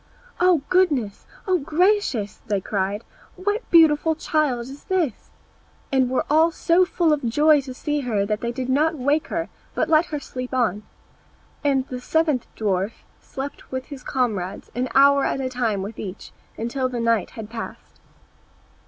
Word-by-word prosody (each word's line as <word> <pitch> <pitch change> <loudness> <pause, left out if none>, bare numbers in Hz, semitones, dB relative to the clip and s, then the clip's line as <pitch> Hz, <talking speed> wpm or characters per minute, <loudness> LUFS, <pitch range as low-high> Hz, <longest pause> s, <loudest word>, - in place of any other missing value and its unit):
"O 355 -5 +4
goodness! 290 - +1 0.2
O 370 -2 +3
gracious!" 310 - +1 0.2
cried 200 +1 -1
they, - - -19
"what 410 +4 -1
beautiful 320 -1 +5
child 305 -6 0
is 270 +4 -10
this?" 345 - -1 0.6
and 260 -2 +3
were 260 - 0 0.3
so 340 +2 +3
full 340 -3 +2
of 295 - -2
joy 295 +5 +4
to 265 -1 -8
see 295 +2 -1
her 220 -7 0
that 210 +1 -2
they 235 - -1
did 255 +1 -4
not 305 +5 +2
wake 290 +3 +1
her, 330 -1 -2 0.3
but 320 - 0
let 320 +1 +4
her 300 - -3
sleep 255 -1 -6
on. 215 -5 +1 0.8
And 270 -2 +1
the 250 -1 -6
seventh 305 -2 +1
dwarf 200 0 0 0.3
slept 275 +1 -8
with 260 0 -3
his 280 -3 -9
comrades, 205 -7 -2
an 250 +1 -2
hour 280 0 +6
at - - 0
a 260 -1 -2
time 230 -6 -1
with 210 +2 -7
each, 195 0 -7 0.3
until 255 +3 -1
the 245 -1 -4
night 230 -4 +1
had 220 -1 -7
passed. 230 -1 -8
265 Hz, 160 wpm, -23 LUFS, 230-310 Hz, 0.8 s, hour